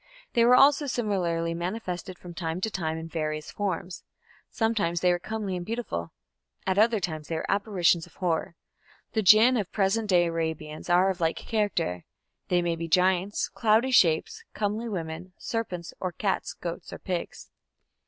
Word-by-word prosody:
They 235 -1 +4
were 250 +1 +7
also 285 +2 +5
similarly 180 -9 -1
manifested 180 0 -4
from 175 -1 -10
time 165 0 -3
to 220 - -1
time 160 -4 -2
in 160 0 -6
various 155 -2 -3
forms. 185 -3 -3 0.5
Sometimes 205 -8 0
they 180 - +4
were 175 - +1
comely 205 0 -3
and 175 - -4
beautiful; 215 - -4 0.5
at 190 +1 +1
other 225 0 +4
times 155 -4 -4
they 165 - -3
were 160 - -2
apparitions 190 -5 +2
of - - -22
horror. 170 -2 -1 0.6
The 220 - +2
Jinn 220 +5 +7
of 205 -5 -2
present 210 +2 +1
day 175 -2 +5
Arabians 160 -2 -3
are 180 +2 +4
of 180 -1 -7
like 165 0 +1
character; 205 - -1 0.4
these 175 -1 +2
may 170 -1 0
be 165 0 -4
giants, 185 +3 +2
cloudy 225 +3 +2
shapes, 185 - +3
comely 215 +3 -1
women, 175 -1 -5
serpents 185 -7 -4
or 185 - -2
cats, 195 +3 -2
goats 170 -1 -6
or - - -6
pigs. 180 -2 -5
180 Hz, 165 wpm, -27 LUFS, 165-215 Hz, 0.6 s, were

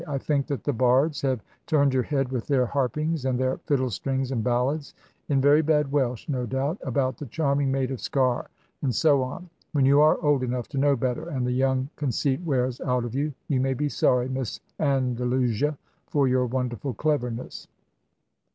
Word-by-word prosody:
I 140 -2 -2
think 140 0 0
that 140 -4 -3
the 145 - 0
bards 130 +5 +2
have 130 -5 -1 0.2
turned 140 -4 +3
your 130 - +3
head 135 -1 -1
with 125 -3 -3
their 135 -3 +3
harpings, 140 +4 -1
and 130 -1 0
their 130 0 0
fiddle 130 -5 +1
strings, 135 +5 -2
and 115 -4 -1
ballads 130 +5 -1 0.3
(in 140 -2 +3
very 145 +3 +5
bad 150 -3 +1
Welsh, 130 -5 0
no 125 -4 -2
doubt) 135 - -1
about 130 0 -1
'the 150 -3 -7
charming 140 +1 0
maid 135 -1 0
of 130 - -4
Sker;' 130 -3 0 0.3
and 130 -5 0
so 145 -1 +4
on. 140 +8 -5 0.3
When 140 -3 +3
you 140 +2 +6
are 155 +1 +5
old 145 -3 +3
enough 125 -1 -2
to 140 - -3
know 140 0 +4
better, 125 0 -2
and 130 -3 -2
the 125 - 0
young 130 +1 +1
conceit 140 +1 0
wears 130 -6 -1
out 125 -1 0
of 120 - -6
you, 145 +3 -1 0.2
you 135 -4 +1
may 135 0 0
be 150 +2 -1
sorry, 125 -2 +2
Miss 130 -3 -3 0.2
Andalusia, 130 -1 +1 0.3
for 140 -2 +2
your 125 0 +2
wonderful 125 0 -3
cleverness." 125 -4 -2
135 Hz, 190 wpm, -25 LUFS, 125-145 Hz, 0.3 s, you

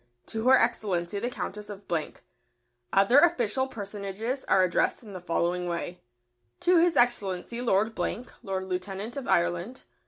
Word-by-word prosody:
To 225 +2 -3
Her 265 - +8
Excellency 200 -5 0
the 240 - -2
Countess 210 -4 -6
of. 200 -1 -8 1.1
Other 200 +8 +6
official 265 -6 +2
personages 210 +3 -5
are 190 - +4
addressed 180 +6 +1
in 210 -3 -11
the 185 - -6
following 175 +1 -1
way: 175 +1 -4 0.6
To 355 -1 +5
His 345 0 +3
Excellency 235 -1 +1
Lord 220 -1 +2
Blank, 235 +2 -3
Lord 190 -1 -3
Lieutenant 195 +4 -4
of 275 -2 -5
Ireland. 175 +8 0
205 Hz, 145 wpm, -28 LUFS, 185-245 Hz, 1.1 s, Her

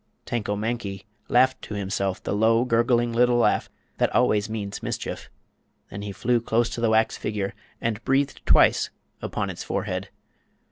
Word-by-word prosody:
Tanko 105 -3 -2
Mankie 105 -3 -3 0.3
laughed 130 +2 +4
to 105 - -6
himself 100 -1 -2
the - - -2
low, 115 +3 +3
gurgling 120 0 +2
little 120 +1 +4
laugh 120 - +2 0.3
that - - +3
always 105 0 +3
means 105 -2 -4
mischief. - - -4 0.6
Then 100 - -6
he 100 0 -5
flew 120 +4 +1
close 115 +1 +1
to 115 - -4
the 115 - +3
wax 110 0 +2
figure 105 -2 -3 0.3
and 115 0 -2
breathed 135 +1 0
twice - - +5 0.3
upon - - -2
its - - -7
forehead. - - -3
115 Hz, 155 wpm, -25 LUFS, 105-120 Hz, 0.6 s, twice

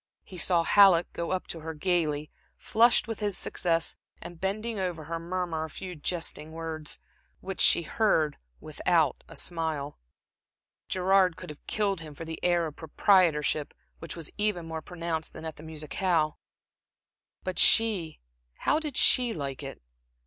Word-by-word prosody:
He 185 - -10
saw 170 0 +3
Halleck 185 -2 +5
go 170 - -4
up 185 -1 -2
to 165 - -4
her 160 0 -6
gaily, 155 -3 0 0.3
flushed 235 +2 +3
with 225 - -5
his 205 -3 -1
success, 165 -2 0 0.2
and 175 -2 -10
bending 215 +3 -2
over 175 -4 -3
her, 165 +2 -4
murmur 170 -2 -3
a 160 - -6
few 180 +3 -7
jesting 160 -1 -2
words, 160 -2 -5 0.4
which 190 0 -4
she 170 - +6
heard 160 -5 +1 0.2
without - - 0
a - - -12
smile. 160 -4 -3 0.9
Gerard 185 -1 +2
could 180 -3 -8
have 150 - -15
killed 200 -4 0
him 155 -2 -10
for 165 - -7
the 160 0 -7
air 175 -1 +3
of 155 -2 -7
proprietorship 160 -3 +2 0.2
which 165 - -5
was 165 -3 -3
even 205 -5 0
more 160 -1 -5
pronounced 165 -1 -4
than - - -9
at 160 - -6
the - - -11
musicale. 155 +1 -1 1.0
But 185 -2 -3
she 205 -9 +4 0.3
how 305 - +1
did 300 -5 -5
she 245 -2 +5
like 140 -3 -5
it? 135 - -8
170 Hz, 155 wpm, -28 LUFS, 160-190 Hz, 1.0 s, she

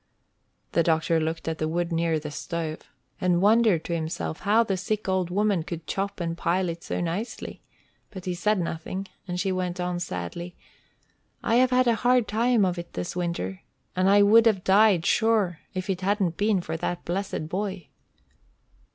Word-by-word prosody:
The 170 - +3
doctor 165 0 +2
looked 160 +1 -3
at 160 -1 -2
the 155 - 0
wood 170 +2 -1
near 165 -1 +1
the 150 -1 -7
stove, 160 0 -5 0.3
and 180 -2 +3
wondered 210 -3 +4
to 170 - -3
himself 160 -1 -3
how 215 +3 +3
the 200 -4 -1
sick 210 +3 -3
old 185 -2 0
woman 200 -1 +1
could 165 0 -6
chop 200 0 -3
and 165 -1 -2
pile 180 +2 0
it 170 0 -6
so - - -3
nicely; 175 +7 -4 0.5
but 190 -3 -9
he 180 - -1
said 210 +3 +1
nothing, 175 +3 -4 0.2
and 180 0 -3
she 190 +1 0
went 180 -1 -2
on 180 0 -1
sadly: 170 - -5 0.9
"I 230 0 +3
have 255 +1 +5
had 255 0 +3
a 235 - +4
hard 245 -2 +3
time 230 0 +2
of 180 -1 -1
it 170 - -9
this 90 - -4
winter, 170 - -3 0.3
and 185 +1 +3
I 205 +1 +6
would 225 +3 +6
have 195 -5 +2
died 195 -3 +4
sure 215 -7 +2 0.2
if 185 +1 -3
it 190 -2 -2
hadn't 190 -3 +1
been 205 -1 +1
for 160 -1 -4
that 175 +1 -3
blessed 185 -3 -3
boy." 190 0 -4
180 Hz, 185 wpm, -26 LUFS, 170-205 Hz, 0.9 s, I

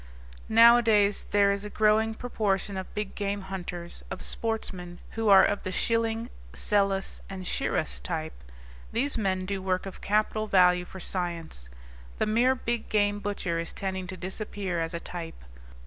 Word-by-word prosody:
Nowadays 225 -3 +5
there 200 -1 +4
is 200 0 -2
a 210 - -5
growing 220 +1 +3
proportion 205 -5 -1
of 190 -1 -5
big 210 -2 -3
game 200 0 -2
hunters, 175 -2 -6
of - - -6
sportsmen, 185 -6 -3
who 225 -1 0
are 195 -1 +9
of 205 - 0
the 185 - -4
Schilling, 230 +3 0 0.2
Selous, 195 - 0
and 190 -1 -6
Shiras 65 - -1
type. - - -3 0.6
These 270 +5 0
men 190 -4 0
do 195 0 -3
work 185 0 -1
of 195 - -8
capital 215 +1 +1
value 180 -2 +5
for 190 - -10
science. 170 - -4 0.5
The - - +1
mere 240 +5 +3
big 235 -2 -3
game 205 -1 +2
butcher 200 -4 -2
is 165 - -4
tending 190 -1 -3
to 185 0 -7
disappear 190 0 -3
as 165 +1 -3
a - - -2
type. 165 - -8
200 Hz, 160 wpm, -28 LUFS, 185-215 Hz, 0.6 s, are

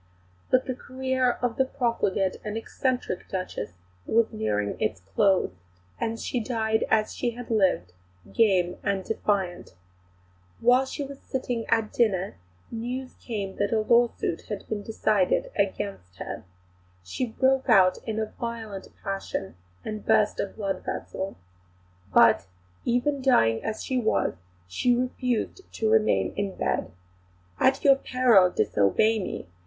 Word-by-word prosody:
But 255 0 +3
the 260 - -2
career 260 0 0
of 240 -2 0
the 265 - +3
profligate 230 -8 0
and 215 +1 -3
eccentric 250 -3 -2
Duchess 185 - -4 0.3
was 230 0 +2
nearing 105 -1 -1
its 95 -4 -1
close, 195 - +3 0.5
and 225 0 -2
she 250 - -2
died 220 -1 0
as 215 -1 +2
she 240 -2 -2
had 245 -1 -7
lived, 185 - +2 0.4
game 185 -6 +3
and 200 -2 -1
defiant. 190 - -2 0.8
While 250 +3 +4
she 285 - -4
was 280 0 -8
sitting 245 -3 -3
at 225 -2 +1
dinner 195 -5 +1 0.3
news 250 +3 -4
came 200 -5 -4
that 205 - 0
a 220 -1 +2
lawsuit 235 -6 +2
had 205 -2 -5
been 215 -2 -3
decided 210 -3 +1
against 195 - -2
her. - - -6 0.6
She 90 - -3
broke 265 +3 +1
out 190 -5 +6
in 220 -1 -2
a 220 -1 -2
violent 225 -4 -5 0.2
passion 195 - -4 0.3
and 215 -1 -5
burst 210 -1 +3
a - - 0
blood 195 -2 -4
vessel. 190 +1 -4 0.7
But, 90 - +5 0.4
even 265 +4 +1
dying 115 - +3
as 220 -1 -3
she 260 -1 0
was, 220 - +1 0.3
she 240 - +2
refused 250 - -1
to 220 -1 0
remain 220 -1 +3
in 200 -1 -2
bed. - - -1 0.7
"At 265 +1 +3
your 275 -1 +7
peril, 245 -9 +4
disobey 180 - +2
me!" 185 - -4
220 Hz, 140 wpm, -26 LUFS, 195-245 Hz, 0.8 s, your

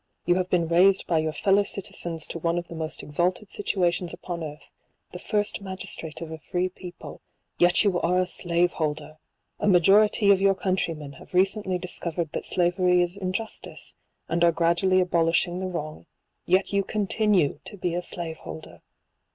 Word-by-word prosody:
You 175 - +4
have 185 0 -1
been 170 -2 +1
raised 185 +4 +4
by 165 -2 +1
your 155 0 -1
fellow 195 +5 +3
citizens 170 -5 -2
to 170 - -5
one 170 +1 0
of 175 0 -3
the - - -9
most 160 -1 -4
exalted 180 +7 -1
situations 180 -3 -1
upon 170 -2 -6
earth, 150 -1 -9 0.4
the - - -8
first 210 -1 0
magistrate 190 -5 -6
of 165 -1 -6
a 160 - -7
free 180 +3 -2
people; 180 -1 -10 0.4
yet 175 +3 +5
you 190 -4 +1
are 180 +2 +2
a 185 - +3
slave 175 -1 0
holder! 155 0 -4 0.4
A - - 0
ma 185 -3 +6
jority 205 +3 +5
of 195 -1 +4
your 195 0 +4
countrymen 165 -6 -2
have 140 - -13
recently 190 0 +2
discovered 170 -2 -3
that - - -4
slavery 180 0 +2
is 175 +1 -4
injustice, 200 +3 -5 0.3
and 170 +1 0
are 170 - +6
gradually 170 +3 +2
abolishing 170 0 +1
the 190 - -3
wrong; 155 -3 -6 0.4
yet 190 +3 +2
you 200 0 +2
continue 205 -6 +1
to 205 - -7
be 175 -2 -2
a 175 - -1
slave 170 -2 -5
holder 80 -1 -10
175 Hz, 175 wpm, -25 LUFS, 165-190 Hz, 0.4 s, ma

